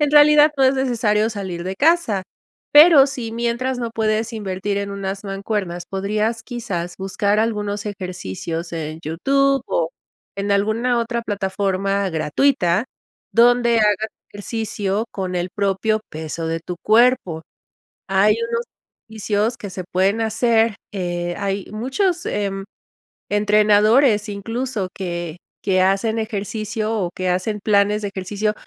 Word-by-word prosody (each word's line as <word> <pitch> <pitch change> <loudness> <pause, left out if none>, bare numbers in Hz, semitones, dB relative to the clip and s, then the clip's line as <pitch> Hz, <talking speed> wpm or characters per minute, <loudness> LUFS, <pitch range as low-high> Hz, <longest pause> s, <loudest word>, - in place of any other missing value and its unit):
en 295 -1 +2
realidad 300 0 +7
no 270 - +2
es 260 +1 +4
necesario 225 -5 +1
salir 190 -5 -5
de 190 +1 -3
casa. 290 - +2 0.5
Pero, 295 -2 +9
si 245 -5 -5
mientras 240 +2 -1
no 235 -1 -3
puedes 220 0 0
invertir 200 -2 -3
en 200 0 -3
unas 195 0 -5
mancuernas, 195 -3 -3
podrías 210 +4 -1
quizás 180 -8 -5
buscar 200 +2 0
algunos 210 -2 -2
ejercicios 170 - -5
en 160 -1 -4
YouTube 275 - +1
o 165 -1 0 0.5
en 200 +1 -1
alguna 220 +5 +1
otra 235 0 -2
plataforma 195 -1 -1
gratuita 175 - +1 0.5
donde 240 0 +4
hagas 210 0 +2 0.2
ejercicio 205 0 -3
con 185 -2 -4
el 175 +1 -1
propio 205 +2 0
peso 160 +1 -5
de 165 0 -2
tu 175 +1 -6
cuerpo. 215 -8 +3 0.7
Hay 195 +2 +4
unos 235 0 -1 0.4
ejercicios 220 +1 -1
que 200 - -8
se 185 -1 -6
pueden 195 +4 +2
hacer, 225 0 +2 0.2
eh, 175 -2 -3
hay 195 -1 -2
muchos, 325 - -1
em, 195 -1 -2 0.7
entrenadores, 210 +2 +4
incluso 225 0 -3
que 175 -3 -5 0.2
que 185 -2 +2
hacen 195 +4 +1
ejercicio, 215 0 -3
o 185 -5 -1
que 185 - -2
hacen 185 +4 -1
planes 205 0 +2
de 200 - -2
ejercicio 205 +2 -2
210 Hz, 130 wpm, -21 LUFS, 190-230 Hz, 0.7 s, Pero